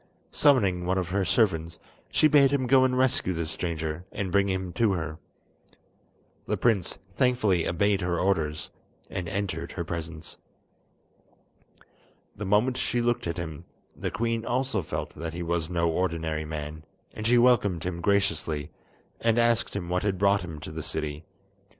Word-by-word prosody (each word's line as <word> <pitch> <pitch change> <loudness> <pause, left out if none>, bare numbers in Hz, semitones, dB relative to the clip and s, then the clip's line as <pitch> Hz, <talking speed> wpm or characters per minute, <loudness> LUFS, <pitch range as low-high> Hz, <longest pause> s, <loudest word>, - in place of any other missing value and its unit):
Summoning 100 -12 +3
one 95 +1 +1
of 90 -2 -1
her 100 +2 +1
servants, 85 -5 +1 0.3
she 155 - +4
bade 145 -2 +6
him 135 -2 +1
go 130 +1 +5
and 130 -1 +2
rescue 130 -7 +2
the 85 -1 -2
stranger, 80 0 -3
and 95 -3 -3
bring 100 +1 +3
him 95 -2 -2
to 110 +1 +2
her. 80 -2 -4 1.3
The - - 0
prince 110 -7 +1 0.2
thankfully 110 -9 +2
obeyed 100 +3 +1
her 90 -1 0
orders, 80 -5 0 0.4
and 90 -3 -3
entered 85 -4 -3
her 85 - -4
presence. 80 -2 -6 2.0
The 105 - -5
moment 110 +6 +3
she 120 - 0
looked 120 -5 0
at 85 +1 -3
him, 85 -2 -5 0.3
the - - -3
queen 115 +2 -1
also 130 0 0
felt - - -4
that 80 +1 -6
he 90 - -3
was 85 -1 -1
no 85 -1 +1
ordinary 80 -3 -1
man, 75 0 -6 0.3
and 110 0 -3
she 120 +1 +5
welcomed 115 -9 +3
him 85 -1 -3
graciously, 90 -6 0 0.5
and 115 0 +2
asked 115 -2 +2
him 95 -4 -3
what 90 +1 0
had 100 -2 0
brought 100 +1 +3
him 80 -4 -7
to - - -7
the 80 +1 -5
city. 75 0 -4
90 Hz, 160 wpm, -27 LUFS, 85-110 Hz, 2.0 s, bade